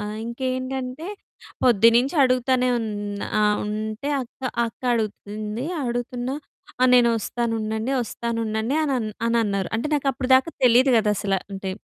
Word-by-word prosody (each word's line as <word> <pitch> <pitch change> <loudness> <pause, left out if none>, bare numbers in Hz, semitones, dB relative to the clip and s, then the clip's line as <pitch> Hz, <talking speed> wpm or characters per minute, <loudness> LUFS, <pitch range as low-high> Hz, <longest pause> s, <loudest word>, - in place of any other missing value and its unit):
ఆహ్, 210 +1 -4
ఇంకేంటంటే 255 +4 -3 0.6
పొద్దున్నుంచి 235 - +4
అడుగుతానే 255 0 +2
ఉన్ 225 -1 -3 0.5
ఆ - - +3 0.2
ఉంటే 215 +5 -3
అక్క, 245 - -15 0.3
అక్క 225 - -11
అడుగుతుంది. 215 +1 -4 0.2
అడుగుతున్నా 245 +2 -3 0.5
ఆ! - - +7
నేనొస్తాను 235 -1 +2
ఉండండి 220 +4 -2
ఒస్తానుండండి 230 +2 -2
అని 295 -3 0 0.3
అని 235 0 +2
అన్నారు. 200 -3 -1
అంటే 230 +6 -1
నాకు 285 -1 -1
అప్పటిదాకా 260 +3 +3
తెలీదు 250 +2 +6
కదా 215 -2 +3
అసల 195 -1 0 0.2
అంటే 195 0 -4
235 Hz, 125 wpm, -23 LUFS, 215-255 Hz, 0.6 s, ఆ